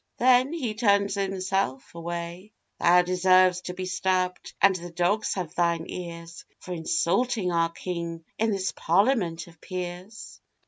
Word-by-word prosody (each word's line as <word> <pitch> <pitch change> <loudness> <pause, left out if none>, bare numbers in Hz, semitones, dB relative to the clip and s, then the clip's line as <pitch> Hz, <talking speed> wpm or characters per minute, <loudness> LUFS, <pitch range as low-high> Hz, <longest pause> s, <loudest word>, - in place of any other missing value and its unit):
then 255 +2 +4
he 265 -10 -2
turned 200 -2 +2
himself 190 -7 -2
away; 170 +3 -6 0.3
'Thou 180 +1 +5
deserves 185 0 +4
to 180 0 -6
be 185 - -4
stabbed, 185 -1 -1
and 195 -1 +5
the 175 -1 -6
dogs 180 +5 0
have 180 -5 -4
thine 170 -1 +1
ears, 170 -1 -8
For 180 - -7
insulting 180 +5 0
our 165 -1 +2
King 170 -1 -5
in 225 +1 +2
this 195 -2 -1
Parliament 180 -3 +1
of 170 -2 -18
peers. 185 +3 -7
180 Hz, 140 wpm, -26 LUFS, 170-195 Hz, 0.3 s, Thou